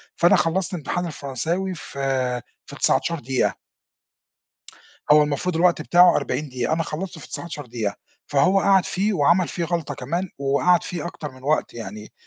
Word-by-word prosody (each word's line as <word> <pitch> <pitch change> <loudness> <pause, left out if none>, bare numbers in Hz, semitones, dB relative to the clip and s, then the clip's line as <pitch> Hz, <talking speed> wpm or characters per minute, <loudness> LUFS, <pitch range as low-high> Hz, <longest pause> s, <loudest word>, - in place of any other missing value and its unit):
فأنا 175 - +5
خلّصت 180 +3 0
امتحان 175 +2 -2
الفرنساوي 165 +5 -3
في 130 -5 -2 0.2
في - - -11
19 170 - +1
دقيقة. 130 0 -1 1.5
هو 150 0 +7
المفروض 150 +4 -2
الوقت 170 -1 +3
بتاعه 175 +3 +6
40 150 -1 -2
دقيقة، 125 +2 -1
أنا 165 +1 0
خلّصته 165 +4 -5
في - - -11
19 155 -4 -6
دقيقة، 115 -4 -3 0.3
فهو 180 +7 +3
قعد 195 -1 +4
فيه 205 +3 0
وعمل 170 +2 +3
فيه 175 - -3
غلطة 165 -4 -2
كمان، 170 +9 -3
وقعد 140 +6 +2
فيه 175 -4 -5
أكتر 155 -4 -6
من 130 0 -16
وقت 150 +3 0
يعني، 105 -2 -8
155 Hz, 155 wpm, -23 LUFS, 135-175 Hz, 1.5 s, هو